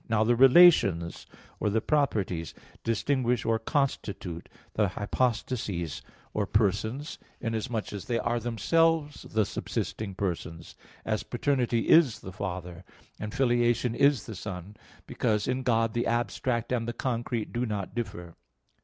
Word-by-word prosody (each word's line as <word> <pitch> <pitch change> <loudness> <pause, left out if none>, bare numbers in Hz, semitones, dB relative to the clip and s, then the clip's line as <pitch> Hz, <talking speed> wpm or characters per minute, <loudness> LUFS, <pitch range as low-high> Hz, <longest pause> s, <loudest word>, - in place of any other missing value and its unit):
Now 110 -1 +3
the 120 +2 +3
relations 125 - +5 0.3
or 105 - +1
the 110 +2 +2
properties 105 - 0 0.3
distinguish 120 +1 0
or 115 -1 +2
constitute 110 - -2 0.2
the 105 -1 +2
hypostases 105 - -2 0.3
or 105 -2 -1
persons, 110 - 0 0.2
inasmuch 115 -1 -3
as 100 - -6
they 120 - 0
are 120 +1 0
themselves 150 +6 +1
the 110 -1 +2
subsisting 100 0 -4
persons; 85 -4 -4 0.3
as 110 -1 0
paternity 120 -3 0
is 155 -8 +5
the 95 - -8
Father, 90 -3 -5 0.4
and 105 - -4
filiation 120 -1 +2
is 140 -4 +3
the 110 - -7
Son, 95 0 -7 0.3
because 105 -1 0
in 130 +1 0
God 115 -3 +1
the 120 - 0
abstract 120 0 -1
and 120 -2 0
the 120 - -2
concrete 120 -2 -2
do 120 +1 -1
not 100 -3 -4
differ. 90 -8 -5
115 Hz, 135 wpm, -28 LUFS, 100-125 Hz, 0.4 s, relations